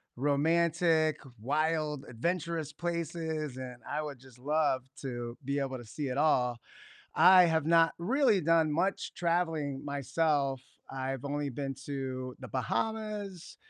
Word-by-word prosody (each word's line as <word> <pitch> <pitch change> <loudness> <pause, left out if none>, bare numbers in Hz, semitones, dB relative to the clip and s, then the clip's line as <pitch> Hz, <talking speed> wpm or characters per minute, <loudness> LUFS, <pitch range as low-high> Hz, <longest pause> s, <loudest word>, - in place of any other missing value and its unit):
romantic, 160 +3 +2 0.2
wild, 150 +2 0
adventurous 165 +4 -2
places, 160 -3 -3
and 125 -1 -7
I 150 +1 -1
would 145 -4 -6
just 130 -1 -17
love 145 -1 +1 0.2
to 120 -3 -5
be 140 +2 -1
able 135 -2 -2
to - - -9
see 140 +6 -4
it 125 - -3
all. 125 -6 +3 0.6
I 185 0 +8
have 160 -3 +1
not 165 0 +5
really 220 +3 +3
done 165 -1 +3
much 185 +6 -1
traveling 165 -5 -1
myself, 140 -1 0 0.3
I've 135 0 -4
only 145 0 -2
been 135 +1 -4
to 130 -2 -4
the 130 - -8
Bahamas, 205 - -3
150 Hz, 130 wpm, -31 LUFS, 135-165 Hz, 0.6 s, I